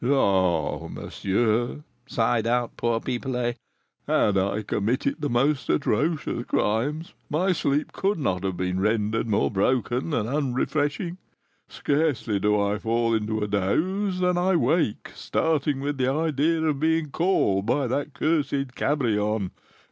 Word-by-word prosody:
"Ah, 95 - +2
monsieur," 115 +7 -1 0.2
sighed 115 -2 +1
out 120 0 0
poor 115 -1 0
Pipelet, 125 -1 -2 0.5
"had 105 - +2
I 100 +2 0
committed 125 +8 -1
the 145 - -1
most 130 +3 +1
atrocious 150 +4 0
crimes, 145 +10 -1 0.2
my 180 +6 +1
sleep 145 -4 0
could 195 0 0
not 95 - -1
have 95 -2 -2
been 90 0 -1
rendered 110 +2 0
more 105 -1 +1
broken 125 +7 0
and 115 -7 0
unrefreshing; 145 +5 -1 0.5
scarcely 140 -8 0
do 105 +1 +2
I 100 +1 0
fall 115 +1 +1
into 110 0 -1
a - - -1
doze 180 - 0
than 180 -1 +2
I 185 +1 +2
wake 165 -8 +1
starting 150 -3 0
with 145 0 -3
the 130 0 +2
idea 160 +2 +1
of 150 -3 0
being 160 -1 +1
called 110 - +1
by 135 +3 +1
that 140 +4 -2
cursed 140 -4 0
Cabrion! 110 -9 0
125 Hz, 135 wpm, -25 LUFS, 105-150 Hz, 0.5 s, Ah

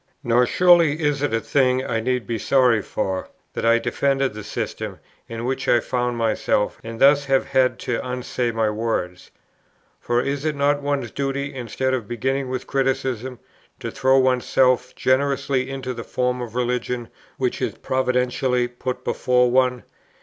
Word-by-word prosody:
"Nor 120 +1 +3
surely 170 -3 +4
is 145 -3 0
it 145 - 0
a 115 - +1
thing 130 0 +1
I 115 - -1
need 125 +1 -1
be 115 -2 -3
sorry 125 -2 +3
for, 95 -1 -3 0.2
that - - -4
I 115 0 +5
defended 135 +2 0
the 105 0 -7
system 105 - -5 0.3
in 115 0 -5
which 130 +1 -2
I 120 - +5
found 125 0 -2
myself, 110 -2 0
and 115 0 -7
thus 140 +1 +5
have 135 -1 +2
had 130 -1 +2
to 120 - -1
unsay 125 -1 -2
my 115 -1 0
words. 105 -5 -3 0.7
For 120 0 0
is 140 +2 -2
it 155 -1 -1
not 145 +1 +1
one's 140 -5 -2
duty, 140 0 -3
instead 130 +1 -2
of 120 -5 -2
beginning 130 +3 -2
with 130 -1 -4
criticism, 130 -2 -1 0.4
to - - -5
throw 135 0 +3
oneself 130 0 +2
generously 135 0 +1
into 130 -2 -4
that 115 -1 -7
form 125 0 -1
of 120 -2 -7
religion 125 -1 -2 0.3
which - - -1
is - - -1
providentially 125 -1 0
put 125 +1 -5
before 125 -1 +2
one? 125 -1 +2
125 Hz, 165 wpm, -22 LUFS, 120-135 Hz, 0.7 s, I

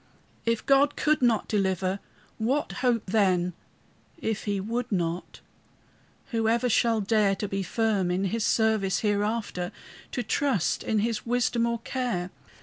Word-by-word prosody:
If 230 -1 0
God 275 +1 +4
could 305 -1 +2
not 235 -4 +2
deliver, 190 -2 0 0.4
what 260 +7 0
hope 245 -3 +2
then? 185 -3 +2 0.6
If 220 -9 -3
he 205 -2 0
would 230 +5 -3
not, 175 -2 -2 0.9
who 225 -2 +1
ever 235 +2 +2
shall 230 -1 +3
dare 205 -1 +2
To 205 - -3
be 195 0 -2
firm 205 -2 0
in 180 +2 0
his 215 +4 -1
service 220 -5 +2
hereafter? 205 -3 -1 0.4
To 245 - -1
trust 260 - 0
in 215 -2 0
his 230 -1 -3
wisdom 240 -1 +1
or 235 0 0
care? 235 -9 -2
220 Hz, 145 wpm, -27 LUFS, 195-235 Hz, 0.9 s, God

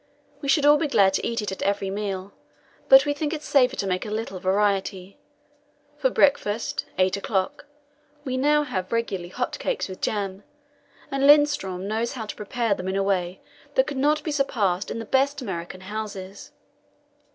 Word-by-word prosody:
We 280 - -3
should 285 +1 +4
all 295 0 +7
be 315 - 0
glad 195 -8 +4
to - - 0
eat 230 -2 -2
it 205 - -3
at 190 - -6
every 200 -1 0
meal, 195 -1 -4 0.6
but 270 +1 +9
we 290 - +1
think 295 +2 -2
it 305 -1 -5
safer 260 -3 +3
to 200 - -2
make 185 -1 -1
a 215 - -6
little 215 -3 -4
variety. 195 0 0 0.8
For 265 -3 +3
breakfast 235 -6 +1
eight 185 +1 +2
o'clock 200 +9 -2 0.6
we 255 -1 -2
now 295 +3 +3
have 190 -10 -4
regularly 200 -7 -2
hot - - -3
cakes - - -2
with 185 -1 -9
jam, 200 -2 -2 0.7
and 275 0 -1
Lindström 290 -11 +4
knows 220 +5 -2
how 235 -5 -5
to - - -7
prepare 225 +1 -1
them 185 -1 -5
in 190 - -1
a 195 - +1
way 185 -2 -1 0.3
that - - +4
could 285 - -5
not 295 +2 +2
be 310 - -2
surpassed 210 -10 0
in - - -4
the 225 - -5
best 275 +5 +1
American 185 -5 -6
houses. 200 -1 -7
210 Hz, 185 wpm, -24 LUFS, 190-275 Hz, 0.8 s, but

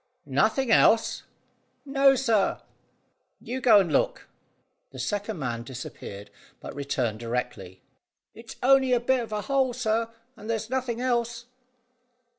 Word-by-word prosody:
"Nothing 220 - +1
else?" 225 0 +4 0.6
"No, 275 -1 +4
sir." 230 -6 +1 0.8
"You 255 +2 -5
go 220 -5 +7
and 175 -6 0
look." - - 0 0.6
The 135 - -13
second 205 - -3
man 120 -5 -3
disappeared, 115 -5 -9 0.3
but - - -8
returned 130 -6 -2
directly. 115 -6 -5 0.5
"It's 230 +1 -11
on'y 265 0 +5
a 245 - +4
bit 255 +2 +1
of 230 -2 -6
a 210 -1 -2
hole, 265 +1 +1
sir, 230 -2 -1 0.3
and 215 0 -11
there's 225 0 -3
nothin' 255 -3 -2
else." 240 -1 -1
225 Hz, 130 wpm, -26 LUFS, -, 0.8 s, go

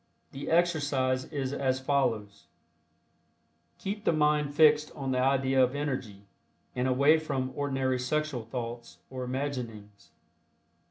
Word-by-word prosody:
The 140 +1 -6
exercise 145 -6 +1
is 140 -3 -3
as 130 -2 0
follows: 125 -7 -1 1.3
Keep 205 +2 -5
the - - +3
mind 150 -2 +1
fixed 150 -1 +5
on 135 -3 -3
the 130 - +1
idea 135 0 +3
of 130 +2 0
Energy, 130 -9 -4 0.5
and 125 +1 0
away 140 +5 +4
from 135 -4 -3
ordinary 135 -2 0
sexual 145 -1 -1
thoughts 120 0 -6
or 130 -1 -5
imaginings. 125 -6 -5
135 Hz, 120 wpm, -29 LUFS, 125-145 Hz, 1.3 s, fixed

